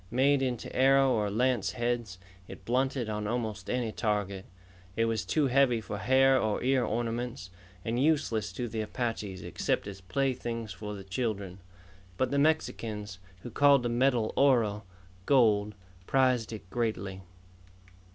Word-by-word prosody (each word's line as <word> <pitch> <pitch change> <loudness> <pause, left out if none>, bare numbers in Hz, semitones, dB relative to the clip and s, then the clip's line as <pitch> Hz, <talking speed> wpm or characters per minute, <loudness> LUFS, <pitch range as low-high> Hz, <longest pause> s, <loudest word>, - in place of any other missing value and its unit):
Made 135 +3 +3
into 125 -3 -3
arrow 135 0 +5
or 105 -4 +1
lance 110 -2 +1
heads, 120 -5 -2 0.3
it - - -11
blunted 130 0 0
on 105 -1 -3
almost 110 -4 -3
any 125 -3 -1
target. 105 -4 -2 0.5
It 115 - +2
was 115 -5 -1
too 145 - +1
heavy 130 -2 +3
for 105 -1 -6
hair 130 +2 +4
or 110 0 -1
ear 130 0 +2
ornaments, 115 -4 -3 0.3
and 120 +2 0
useless 135 -9 +1
to 120 +5 -3
the 110 -1 -3
Apaches 110 -4 -4
except - - -1
as 100 -1 -8
playthings 115 +1 -2
for 105 +2 -6
the 100 - -8
children. 100 -2 -3 0.6
But 130 - 0
the 140 - +1
Mexicans, 110 -10 -1 0.2
who 120 - -7
called 140 +1 +5
the 120 - 0
metal 120 -2 +1
oro 115 -7 +3 0.4
gold 105 -6 +3 0.3
prized 130 -4 +2
it 105 -4 -8
greatly. 100 -5 -2
115 Hz, 145 wpm, -29 LUFS, 105-130 Hz, 0.6 s, arrow